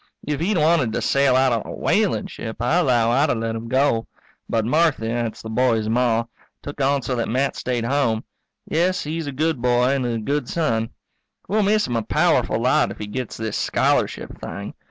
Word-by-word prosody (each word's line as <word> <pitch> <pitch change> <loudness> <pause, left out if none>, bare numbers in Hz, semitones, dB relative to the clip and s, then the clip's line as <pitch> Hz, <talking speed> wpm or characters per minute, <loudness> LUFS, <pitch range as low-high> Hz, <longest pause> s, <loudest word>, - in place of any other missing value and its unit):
If 150 -1 -1
he'd 185 +4 +1
wanted 155 -7 +2
to - - -1
sail 140 -2 +3
out 130 -1 +3
on 115 - 0
a - - -7
whaling - - +1
ship, 110 - -7
I 155 +9 +2
'low 120 -6 +2
I'd 140 +5 +3
have - - +1
let 115 0 -2
him 115 +1 -6
go. 130 -2 +1 0.4
But 110 -1 0
Marthy 150 -4 +2
that's 115 -1 -3
the 110 - -6
boy's 115 -2 +1
Ma 115 -1 +2 0.4
took 145 0 -6
on 140 0 +2
so 125 - -2
that 115 - -2
Matt 130 +4 0
stayed 120 -2 -2
home. 120 -4 +1 0.4
Yes, 180 +4 0
he's 160 +1 -4
a - - -3
good 155 0 -1
boy 125 0 +3
and 135 -2 0
a 115 -1 -1
good 140 +4 -2
son. 115 -9 0 0.6
We'll 215 +4 +1
miss 210 +1 +2
him 120 - -3
a - - 0
powerful - - +1
lot - - +2
if - - -8
he 105 - -5
gets 125 +3 -5
this 110 -1 -3
scholarship - - 0
thing. - - -6
125 Hz, 205 wpm, -22 LUFS, 115-145 Hz, 0.6 s, sail